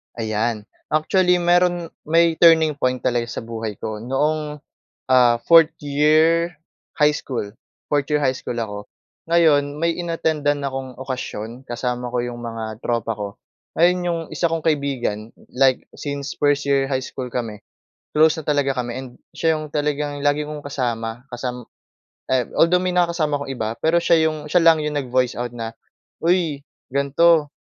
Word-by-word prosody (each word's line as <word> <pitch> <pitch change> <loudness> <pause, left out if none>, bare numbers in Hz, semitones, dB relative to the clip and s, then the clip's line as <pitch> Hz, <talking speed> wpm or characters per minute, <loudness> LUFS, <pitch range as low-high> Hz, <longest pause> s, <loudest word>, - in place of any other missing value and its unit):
Ayan, 110 -1 -1 0.2
actually 180 +4 +2
meron 175 -1 +2 0.2
may 165 0 +3
turning 160 -3 +5
point 130 0 0
talaga 120 -1 0
sa 115 - -6
buhay 115 -2 -5
ko, 105 +1 -5
noong, 150 +4 -1 0.5
ah, 125 -2 +6
fourth-year 160 +1 +4 0.4
high 150 -1 +4
school, 120 -8 -4 0.4
fourth-year 145 +1 +1
high 130 - +3
school 120 - -5
ako. 110 -3 -3 0.5
Ngayon, 150 -4 +3
may 165 +2 +1
in-attendan 160 -4 -1
akong 135 -2 -4
okasyon 125 -2 -6
kasama 125 +1 -3
ko 120 0 -1
'yong 120 0 -5
mga 115 -2 -6
tropa 115 -2 -1
ko. 105 -1 -4 0.5
Ngayon, 175 +2 +4
'yong 170 -1 -1
isa 170 - +1
kong 165 -1 -2
kaibigan, 135 -8 -1 0.2
like 130 0 +3 0.2
since 140 -2 -4
first-year 140 -1 +2
high 130 -1 -1
school 130 -1 -6
kami, 115 -4 -4 0.5
close 155 +1 +4
na 160 - -6
talaga 145 -2 +1
kami, 120 -1 -2
and 130 - -8 0.2
siya 160 -1 +1
'yong 155 -1 -7
talagang 145 -1 -1
lagi 145 +1 +1
kong 150 0 -6
kasama 120 -4 -3
kasam 125 0 -5 0.7
ay 125 -3 +2
although 180 +2 +4
may 180 0 -1
nakakasama 170 -4 +1
akong 140 -1 -5
iba, 110 -2 -2
pero 165 +2 +3
siya 165 -2 +4
'yong, 155 -1 -4
siya 180 - +5
lang 165 -1 +6
'yong 150 -1 -2
nag-voice 125 -1 0
out 120 -1 -3
na, 115 -1 -5 0.5
"Uy, 165 -5 +1 0.3
ganito, 145 +3 +3
145 Hz, 150 wpm, -21 LUFS, 120-160 Hz, 0.7 s, ah